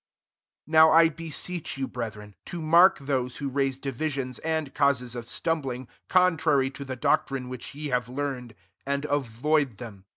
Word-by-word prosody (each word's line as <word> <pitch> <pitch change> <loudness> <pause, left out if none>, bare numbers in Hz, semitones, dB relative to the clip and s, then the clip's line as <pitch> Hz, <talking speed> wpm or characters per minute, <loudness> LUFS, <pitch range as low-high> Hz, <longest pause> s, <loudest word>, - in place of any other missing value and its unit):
17 - - -16
Now 160 0 +8
I 165 0 +7
beseech 165 0 -4
you, 135 -1 -2
breth 115 -4 -5
ren, 105 -1 -12
to 175 - -5
mark 170 +4 +6
those 130 -3 -2
who 140 -1 -3
raise 135 -1 0
divisions 135 -1 -3
and 160 -3 -2
causes 125 -4 +1
of 120 -1 -6
:stumb 165 -1 0
ling, 130 -1 -5 0.2
contrary 160 -7 +3
to 140 - -8
the 130 -1 -5
doctrine 130 +1 0
which 130 +2 -7
ye 150 0 -4
have 125 -2 -1
learned; 130 -4 -4 0.3
and 140 +1 -2
avoid 145 -1 0
them. 105 -6 -10
140 Hz, 170 wpm, -26 LUFS, 125-155 Hz, 0.3 s, Now